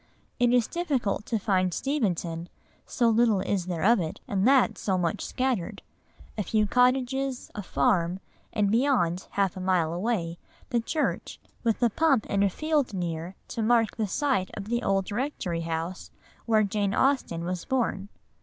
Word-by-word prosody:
It 245 Hz, -1 st, +4 dB
is 245 Hz, -2 st, +4 dB
difficult 275 Hz, -, -1 dB
to 230 Hz, -, 0 dB
find 185 Hz, -3 st, +1 dB
Steventon, 175 Hz, -, -2 dB, 0.4 s
so 240 Hz, -, +1 dB
little 225 Hz, -3 st, +3 dB
is 190 Hz, -2 st, -1 dB
there 170 Hz, -3 st, -2 dB
of 230 Hz, +2 st, +5 dB
it, 160 Hz, -3 st, -4 dB
and 200 Hz, +2 st, +1 dB
that 270 Hz, -1 st, +4 dB
so 190 Hz, -2 st, 0 dB
much 175 Hz, +2 st, -1 dB
scattered; 255 Hz, -9 st, -2 dB, 0.6 s
a -, -, +2 dB
few 215 Hz, +2 st, +1 dB
cottages, 255 Hz, +3 st, +1 dB
a 210 Hz, -, -5 dB
farm, 185 Hz, -3 st, +1 dB, 0.3 s
and 205 Hz, -3 st, +1 dB
beyond, 220 Hz, -8 st, +1 dB
half 195 Hz, -3 st, +1 dB
a -, -, -6 dB
mile 180 Hz, -3 st, +1 dB
away, 175 Hz, -3 st, -2 dB, 0.3 s
the 240 Hz, -, +2 dB
church, 300 Hz, +7 st, -2 dB, 0.2 s
with 230 Hz, +1 st, +1 dB
a 240 Hz, -, +5 dB
pump 275 Hz, -4 st, +2 dB
in 200 Hz, -, 0 dB
a 200 Hz, -, +4 dB
field 295 Hz, -, 0 dB
near 170 Hz, 0 st, -4 dB
to 230 Hz, -, -3 dB
mark 225 Hz, -1 st, +3 dB
the 220 Hz, -2 st, -1 dB
site 250 Hz, -2 st, 0 dB
of 205 Hz, 0 st, -6 dB
the 235 Hz, 0 st, 0 dB
old 195 Hz, -2 st, 0 dB
rectory 205 Hz, -8 st, -2 dB
house 165 Hz, +2 st, -4 dB, 0.4 s
where 220 Hz, -1 st, +4 dB
Jane 200 Hz, -1 st, 0 dB
Austen 260 Hz, -12 st, +1 dB
was 180 Hz, 0 st, -3 dB
born. 225 Hz, -6 st, -1 dB
210 Hz, 165 wpm, -27 LUFS, 185-245 Hz, 0.6 s, of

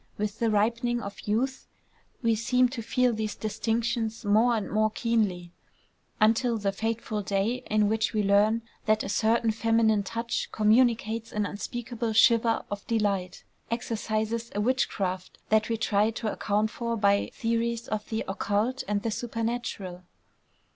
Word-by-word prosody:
With 210 Hz, +1 st, -3 dB
the 230 Hz, -, +2 dB
ripening 235 Hz, +3 st, +1 dB
of 200 Hz, -3 st, -7 dB
youth 255 Hz, +5 st, -1 dB, 0.6 s
we 230 Hz, -1 st, +3 dB
seem 250 Hz, +3 st, +2 dB
to 245 Hz, -2 st, -5 dB
feel 250 Hz, +2 st, +1 dB
these 215 Hz, -1 st, -3 dB
distinctions 225 Hz, +1 st, -2 dB
more 220 Hz, +4 st, +4 dB
and 210 Hz, -3 st, -2 dB
more 215 Hz, +1 st, +2 dB
keenly, 210 Hz, -7 st, -1 dB, 0.7 s
until 230 Hz, +2 st, +3 dB
the 200 Hz, -2 st, 0 dB
fateful 220 Hz, +1 st, -2 dB
day 200 Hz, +5 st, -1 dB
in 215 Hz, -1 st, +3 dB
which 220 Hz, +1 st, +1 dB
we 215 Hz, -2 st, 0 dB
learn 210 Hz, +3 st, +3 dB, 0.2 s
that 215 Hz, 0 st, +3 dB
a -, -, -5 dB
certain 225 Hz, +3 st, +2 dB
feminine 220 Hz, -1 st, +2 dB
touch 230 Hz, +4 st, -3 dB
communicates 225 Hz, 0 st, +2 dB
an 210 Hz, -1 st, -1 dB
unspeakable 230 Hz, +2 st, -4 dB
shiver 230 Hz, +1 st, +4 dB
of 205 Hz, -1 st, -5 dB
delight, 200 Hz, -5 st, -1 dB, 0.3 s
exercises 225 Hz, 0 st, -2 dB
a -, -, 0 dB
witchcraft 200 Hz, -6 st, -1 dB
that 220 Hz, +1 st, +3 dB
we 230 Hz, -, 0 dB
try 210 Hz, 0 st, +2 dB
to 225 Hz, -1 st, -3 dB
account 210 Hz, +1 st, 0 dB
for 235 Hz, -1 st, -3 dB
by 200 Hz, -1 st, +2 dB
theories 230 Hz, +1 st, -1 dB
of 215 Hz, -1 st, -4 dB
the 220 Hz, 0 st, -2 dB
occult 205 Hz, +6 st, -1 dB
and 205 Hz, 0 st, -1 dB
the 225 Hz, -, -1 dB
supernatural. 230 Hz, -5 st, -3 dB
220 Hz, 145 wpm, -27 LUFS, 210-230 Hz, 0.7 s, more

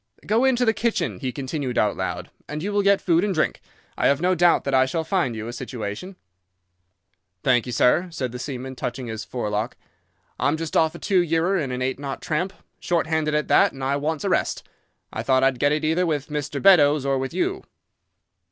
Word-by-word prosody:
'Go 225 Hz, +5 st, +2 dB
into 250 Hz, -2 st, +3 dB
the 225 Hz, -, +3 dB
kitchen,' 235 Hz, +1 st, -1 dB
he 130 Hz, -2 st, -3 dB
continued 135 Hz, -1 st, -4 dB
out 105 Hz, -1 st, +2 dB
loud, 90 Hz, -1 st, -4 dB, 0.2 s
'and 150 Hz, +1 st, -4 dB
you 205 Hz, +1 st, -2 dB
will 205 Hz, -, +3 dB
get 200 Hz, 0 st, +4 dB
food 170 Hz, 0 st, +2 dB
and 200 Hz, -3 st, 0 dB
drink. -, -, 0 dB, 0.3 s
I -, -, +2 dB
have 140 Hz, 0 st, +3 dB
no 180 Hz, +2 st, +2 dB
doubt 175 Hz, -1 st, +4 dB
that 140 Hz, -, -2 dB
I 130 Hz, 0 st, +4 dB
shall 160 Hz, +4 st, -2 dB
find 170 Hz, -, 0 dB
you 110 Hz, 0 st, -5 dB
a 120 Hz, -, -6 dB
situation.' 120 Hz, -, -6 dB, 1.3 s
"'Thank 125 Hz, -2 st, +3 dB
you, -, -, -4 dB
sir,' 125 Hz, +9 st, +3 dB
said 130 Hz, -7 st, -4 dB
the 125 Hz, -, -7 dB
seaman, 130 Hz, -1 st, -6 dB
touching 125 Hz, +1 st, -4 dB
his 110 Hz, -1 st, -5 dB
forelock. 110 Hz, -1 st, -3 dB, 0.6 s
'I'm 145 Hz, +2 st, +1 dB
just 165 Hz, -1 st, -5 dB
off 160 Hz, 0 st, +3 dB
a -, -, -6 dB
two 190 Hz, +1 st, +1 dB
yearer 170 Hz, +3 st, +1 dB
in 140 Hz, -5 st, -3 dB
an 125 Hz, 0 st, -2 dB
eight 130 Hz, +1 st, -2 dB
knot 140 Hz, -1 st, -5 dB
tramp, 170 Hz, +5 st, -2 dB, 0.3 s
short 170 Hz, -2 st, 0 dB
handed 155 Hz, -1 st, 0 dB
at 150 Hz, -, 0 dB
that, -, -, +5 dB
and 135 Hz, -1 st, -8 dB
I 135 Hz, +1 st, +1 dB
wants 150 Hz, +1 st, -2 dB
a -, -, 0 dB
rest. -, -, -1 dB, 0.5 s
I -, -, -3 dB
thought 130 Hz, -1 st, +2 dB
I'd 135 Hz, -2 st, +2 dB
get 145 Hz, -, +3 dB
it 150 Hz, +1 st, 0 dB
either 170 Hz, +3 st, +1 dB
with 150 Hz, -2 st, -2 dB
Mr. 145 Hz, -1 st, -3 dB
Beddoes 150 Hz, -7 st, +5 dB
or 135 Hz, -1 st, +1 dB
with 135 Hz, 0 st, -3 dB
you. 375 Hz, +2 st, -1 dB
145 Hz, 215 wpm, -23 LUFS, 130-175 Hz, 1.3 s, that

